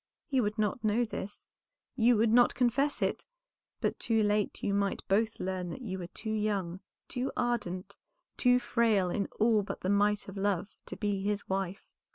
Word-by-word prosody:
He 265 -3 +1
would 210 0 -1
not 215 +2 0
know 220 +3 +2
this, 205 -2 -7 0.5
you 240 -1 +4
would 220 +1 +3
not 245 +1 +5
confess 255 +4 +1
it, - - -1 0.5
but - - -1
too 225 -2 +2
late 210 0 0
you 200 - +1
might 200 -1 -1
both 220 +3 +1
learn 185 -1 -3
that 260 - -7
you 190 -4 -4
were 175 - -5
too 220 +4 -5
young, 200 -5 -1 0.3
too 255 +2 -2
ardent, 200 -6 -2 0.4
too 250 -1 +4
frail 225 -7 +2
in 200 +1 -1
all 220 -1 +4
but 200 - -6
the 185 - -1
might 205 +1 +2
of 195 0 -8
love, 200 -1 0 0.2
to - - -6
be 205 -2 -1
his 205 +1 -2
wife. 190 0 -2
210 Hz, 185 wpm, -31 LUFS, 195-230 Hz, 0.5 s, not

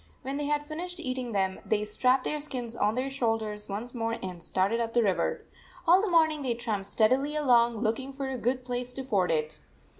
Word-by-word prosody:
When 270 +2 -3
they 295 - -2
had 295 0 0
finished 355 +3 -4
eating 255 -5 -3
them, 190 -2 0
they 210 -1 0
strapped 255 +5 +2
their 300 - -1
skins 250 -6 -5
on 215 -1 +1
their 255 +2 -1
shoulders 225 -5 -2
once 220 +5 -5
more 230 -2 -1
and 180 -2 -6
started 195 +5 +1
up 230 0 -2
the 240 - +5
river. 195 -3 0 0.4
All 350 +3 +6
the 425 - 0
morn 325 -2 +5
ing 305 -1 -4
they 250 -4 0
tramped 215 -4 -3
steadily 255 +8 +2
along, 240 -5 +4
looking 250 +5 -1
for 275 0 -4
a 265 -1 -3
good 250 +2 -1
place 250 0 -3
to 265 - -4
ford 200 -8 +1
it. 155 -1 -1
245 Hz, 215 wpm, -29 LUFS, 215-275 Hz, 0.4 s, All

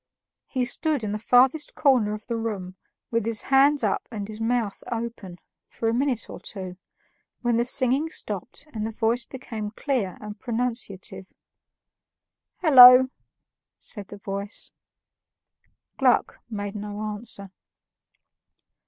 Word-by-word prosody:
He 255 -2 -1
stood 300 0 -1
in 210 - -2
the 210 - -3
farthest 255 +6 +3
corner 235 -7 +3
of 215 - -11
the 235 - -3
room, 205 -5 -4 0.4
with 230 -1 +1
his 225 0 0
hands 275 0 +4
up 205 - 0
and 205 -3 -5
his 215 +1 -8
mouth 225 -3 -1
open, 230 -6 -5 0.3
for 225 - -3
a 225 - +2
minute 255 -1 0
or - - -9
two, 185 -3 -7 0.7
when 240 -1 +2
the 235 - +2
singing 260 +4 +2
stopped - - -5
and 215 - -3
the 220 - -2
voice 230 +2 0
became 225 -5 -6
clear 225 -4 -2
and 210 0 -8
pronunciative. 230 -6 -4 1.3
"Hollo!" 260 -5 +9 0.7
said 205 -4 -7
the 205 - -10
voice. 200 +1 -5 1.3
Gluck - - +2
made 205 -2 -4
no 205 0 -6
answer. 210 -2 -5
225 Hz, 130 wpm, -25 LUFS, 205-250 Hz, 1.3 s, Hollo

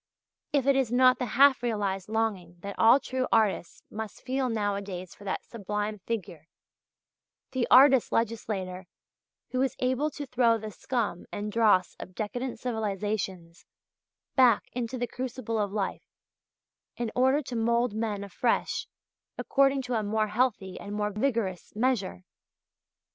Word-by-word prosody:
_) - - -64 0.5
if 285 -3 +1
it 275 -1 +4
is 265 -4 +1
not 255 +1 +5
the 245 -3 -3
half 275 -2 +6
realized 205 -5 -2
longing 210 -6 -1
that 200 +1 -5
all 230 +4 +7
true 260 -1 -2
artists 210 -6 +1
must 220 -1 -7
feel 260 0 -1
nowadays 200 -4 -3
for 205 - -15
that 190 - -3
sublime 210 -1 -4
figure, 180 -7 -5 1.0
the 255 -2 0
artist 265 -1 +7
legislator 195 -5 -2 0.6
who 255 - 0
is 270 - 0
able 260 +4 0
to 290 -1 -7
throw 245 -3 +3
the 215 -1 -7
scum 220 -5 -3
and 210 +1 -4
dross 210 -5 +3
of 185 - -9
decadent 245 +4 -3
civilizations 205 -6 -3 0.7
back 250 -5 +4
into 245 +1 -3
the 245 - -1
crucible 245 -2 -4
of 205 -2 -1
life, 200 -2 -3 0.9
in 235 -2 -2
order 265 +4 +3
to 250 - -6
mould 235 0 +1
men 215 -2 -2
afresh 215 +4 -1 0.5
according 275 -1 +2
to 250 0 -4
a 225 - +1
more 215 +1 0
healthy 210 -4 0
and 205 +1 -6
more 210 0 -1
vigorous 210 -6 -2
measure? 220 -6 0
225 Hz, 145 wpm, -28 LUFS, 205-255 Hz, 1.0 s, all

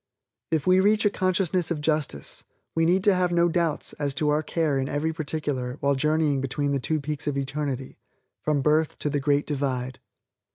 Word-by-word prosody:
If 160 -3 0
we 185 0 +5
reach 210 +3 +3
a 205 - +4
consciousness 185 -2 0
of 170 -3 -1
justice, 150 - -1 0.3
we 165 0 +2
need 185 +4 +2
have 185 -3 +3
no 170 0 +3
doubts 170 -3 -1
as 140 -2 -1
to 150 +2 +1
our 150 +1 +2
care 155 -3 0
in 135 +1 -2
every 155 +3 -1
particular 145 -5 -3
while 140 0 +2
journeying 150 0 +1
between 140 +2 -1
the 140 - +1
two 155 +4 -1
peaks 150 0 -4
of 145 -1 0
eternity 135 -1 -3 0.4
from 150 -3 0
birth 155 +1 +2
to 150 - -2
the 145 - 0
Great 145 +1 +1
Divide. 130 -3 -2
150 Hz, 190 wpm, -25 LUFS, 140-165 Hz, 0.4 s, we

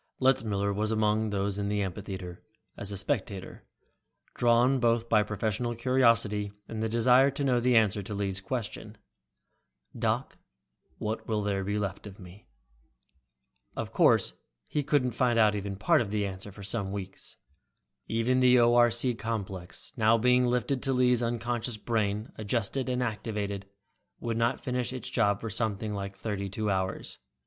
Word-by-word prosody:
Letzmiller 105 -6 +2
was 105 +2 -1
among 110 0 +1
those 100 0 -1
in 100 - -1
the 105 0 0
amphitheater, 95 -1 -6 0.3
as 100 - -5
a 100 - -4
spectator, 100 -5 -3 0.7
drawn 120 +3 +3
both 115 -1 +2
by 110 -2 +4
professional 110 +3 -2
curiosity 115 -4 +2 0.2
and 110 -1 -4
a 110 - 0
desire 125 +4 +5
to 140 +1 -3
know 125 -3 +3
the 125 +1 +2
answer 105 -2 +3
to 100 +2 -6
Lee's 100 -1 -2
question, 115 +2 -5 1.0
"Doc, - - -1 0.6
what 110 +1 -4
will 105 -2 0
there 100 -1 -1
be 100 +2 -1
left 100 0 -4
of 100 -1 -11
me?" 90 +2 -14 1.3
Of - - -4
course - - +4 0.3
he 150 - -1
couldn't 140 -3 +1
find 120 0 +1
out 110 -2 +5
even 100 -1 -3
part 155 - +3
of 110 - -3
the 105 0 0
answer 95 +1 -6
for 100 +1 -11
some 100 -1 -1
weeks. 95 -1 -8 0.7
Even 115 +3 +1
the 125 -1 +6
ORC 120 +1 +4
complex, 100 -6 -5
now 110 -1 +4
being 125 +1 +3
fitted 125 +2 0
to 135 -1 0
Lee's 125 -1 +3
unconscious 120 0 -2
brain, 105 -1 -1
adjusted 120 +4 -1
and 125 0 0
activated, 105 -3 -3 0.5
would 115 -1 -2
not 115 +1 0
finish 125 -2 -2
with 130 -1 -5
its - - -6
job 100 -4 +2
for 115 - -5
something 110 -1 -1
like 100 -1 -5
thirty 100 -3 -4
two 105 +1 -2
hours. 95 0 -3
110 Hz, 160 wpm, -29 LUFS, 100-120 Hz, 1.3 s, the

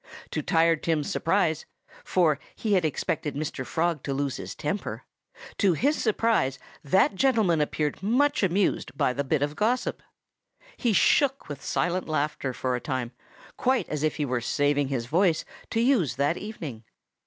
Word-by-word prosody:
To - - -1
Tired 165 -1 +3
Tim's 155 -3 0
surprise 165 -3 +1 0.4
for 160 -6 +2 0.2
he 215 -2 -1
had 185 -3 +3
expected 150 -1 -2
Mr. 145 -2 -3
Frog 165 +2 -1
to 135 0 -3
lose 140 -1 -1
his 95 0 -7
temper 155 +8 -3 0.6
to 195 -4 +4
his 285 - +1
surprise 215 - +1 0.3
that 190 +8 +3
gentleman 210 - +2
appeared 150 +1 -1
much 285 +9 +2
amused 190 -5 0
by 125 - +2
the 140 - -1
bit 140 +1 +1
of 145 +1 -2
gossip. 230 +8 0 0.7
He 240 - 0
shook 275 +6 +3
with 145 -2 -7
silent 180 -1 -1
laughter 150 -3 -1
for 125 0 -2
a 125 - -4
time, 130 -4 -3 0.5
quite 260 0 +1
as 150 -2 -2
if 155 0 +1
he 150 - -1
were 130 -3 -1
saving 145 +3 +1
his 130 -4 -2
voice 165 +5 +2 0.2
to 225 - -1
use 230 - +2
that 140 +5 +1
evening. 160 - -7
160 Hz, 165 wpm, -26 LUFS, 140-200 Hz, 0.7 s, to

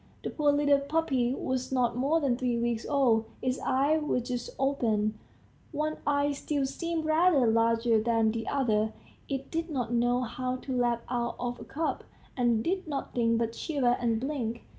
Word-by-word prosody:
The - - -3
poor 295 -2 +2
little 285 -1 +3
puppy 280 -4 0
was 255 -1 -3
not 245 -3 +1
more 280 +6 +2
than 275 -5 +1
three 245 -1 -1
weeks 235 -1 -1
old, 245 -6 +3
its 255 0 -1
eyes 290 +4 +2
were 300 -4 0
just 245 0 -4
open 220 -6 0 0.5
one 305 0 -2
eye 290 0 +2
still 285 0 -1
seemed 330 +3 -3
rather 315 -3 +4
larger 230 0 +3
than 225 -1 +2
the 225 0 -4
other; 220 -6 +1 0.4
it 270 -1 -4
did 330 +1 -2
not 245 -6 -2
know 245 +1 +2
how 255 +1 -3
to 255 0 -5
lap 240 -1 +1
out 240 -1 -2
of 245 0 -3
a - - -8
cup, 315 +3 -2 0.3
and 235 -3 +2
did 370 0 -1
nothing 240 -5 0
but 230 0 -1
shiver 255 -4 +1
and 230 -2 +1
blink. 240 -4 -3
255 Hz, 175 wpm, -29 LUFS, 235-285 Hz, 0.5 s, rather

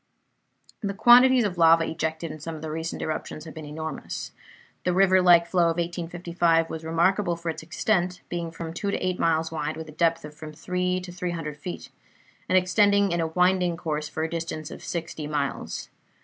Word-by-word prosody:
The 200 -2 -3
quantities 245 +3 +7
of 185 -4 -2
lava 165 0 +6
ejected 160 0 -3
in 155 - -8
some 165 +2 -6
of 155 - -9
the 155 - -4
recent 160 +1 -4
eruptions 155 0 -4
have 160 - -9
been 155 -2 -8
enormous. 160 +2 -5 0.5
The 180 -1 +1
river 190 0 +5
like 175 -2 +6
flow 175 0 +2
of 165 0 +1
1855 170 -1 0
was 160 0 -5
remarkable 175 +3 +1
for 170 0 -3
its - - -8
extent, 180 +2 0
being 170 -1 -3
from 165 0 -7
two 200 +4 -3
to - - 0
eight 185 -1 -2
miles 160 -1 +1
wide, 155 0 -3
with 160 -1 -7
a - - -8
depth 165 0 +1
of 150 - -10
from 155 0 -9
three 180 +3 -1
to 180 0 -8
three 180 0 -4
hundred 155 -3 -5
feet, 175 +4 -7 0.6
and 185 - +5
extending 200 +1 +3
in 170 0 0
a 165 - 0
winding 180 +1 +2
course 150 -2 -3
for 155 - -3
a - - 0
distance 165 -2 -4
of - - -9
sixty 160 -3 -4
miles. 145 -2 -3
170 Hz, 200 wpm, -26 LUFS, 160-180 Hz, 0.6 s, quantities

